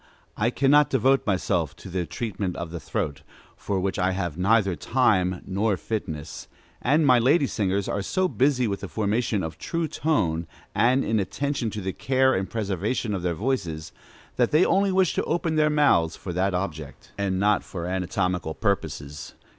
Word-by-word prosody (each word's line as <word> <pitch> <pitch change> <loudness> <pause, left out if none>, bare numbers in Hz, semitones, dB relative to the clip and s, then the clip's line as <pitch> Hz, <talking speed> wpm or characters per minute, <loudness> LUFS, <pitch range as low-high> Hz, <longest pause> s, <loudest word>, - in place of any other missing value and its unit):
_ - - -32 0.3
I 110 +2 +1
cannot 140 +3 +4
devote 135 +1 +2
myself 90 -6 0
to 85 - -12
the 90 -2 -3
treatment 100 -5 -3
of 85 -1 -5
the 85 - -5
throat, 80 -7 -3 0.3
for 100 -2 -2
which 95 +1 -2
I 95 +1 +2
have 90 -5 -3
neither 100 +1 +2
time 95 -6 +1
not 100 +1 0
fitness; 80 -9 -5 0.3
and 150 +5 +3
my 125 -3 +6
lady 140 +5 +4
singers 100 -5 -1
are 100 - -1
so 185 - 0
busy 130 -5 +2
with 100 -1 -2
the - - -6
formation 110 -1 0
of 80 -1 -6
true 165 -1 -2
tone, 85 - 0 0.3
and 125 +4 +3
in 110 -1 +1
attention 130 +5 -2
to - - -3
the 95 0 -3
care 130 0 +2
and 95 0 -1
preservation 105 +1 -2
of 95 - -2
their 85 -1 -1
voices, 85 -9 -2 0.5
that 120 -2 +3
they 155 +4 +4
only 195 +2 +2
wish 185 -2 +3
to - - 0
open 165 -1 -1
their 155 0 +3
mouths 140 - +3
for 90 - -6
that 95 +1 0
object, 80 -6 -5
and 95 -2 0
not 105 0 +2
for 85 -3 -6
anatomical 90 -2 -1
purposes. 75 -8 -3
100 Hz, 180 wpm, -25 LUFS, 90-130 Hz, 0.5 s, my